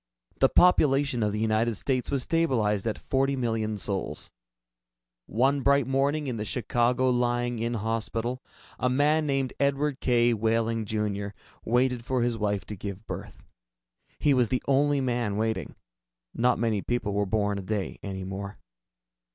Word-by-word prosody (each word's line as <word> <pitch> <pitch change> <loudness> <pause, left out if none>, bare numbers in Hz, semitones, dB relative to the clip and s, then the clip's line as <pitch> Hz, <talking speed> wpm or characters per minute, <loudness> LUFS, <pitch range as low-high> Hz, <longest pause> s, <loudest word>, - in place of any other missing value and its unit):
The - - +5
population 140 -7 +4
of 105 -1 +1
the 105 - -3
United 110 +1 +1
States 130 +4 -1
was 135 -3 0
stabilized 115 -11 +1
at 110 - -1
forty 135 +1 0
million 110 -4 -1
souls. 100 -1 -4 1.0
One 135 +6 +2
bright 140 0 +3
morning 140 +3 +1
in 125 -4 -3
the 105 - -3
Chicago 125 +2 +1
Lying 120 -1 0
in 115 +1 -1
Hospital, 115 +3 -2 0.4
a 125 - +1
man 150 +4 +2
named 135 -2 0
Edward 140 0 +1
K. 120 -1 +3
Wehling, 115 0 0
Jr., 105 -1 -2 0.3
waited 125 0 +1
for 125 0 0
his 120 -1 0
wife 105 -4 -1
to 105 - -6
give 100 +2 -7
birth. - - -8 0.7
He 145 - +3
was 125 -4 +2
the 130 - -1
only 140 +1 +3
man 120 -5 -1
waiting. 110 -7 -2 0.6
Not 125 +1 +2
many 110 -3 0
people 110 -3 -2
were 100 0 0
born 105 -1 0
a - - -4
day 100 0 -3
any 95 -1 -5
more. 100 +2 -6
120 Hz, 155 wpm, -27 LUFS, 105-130 Hz, 1.0 s, The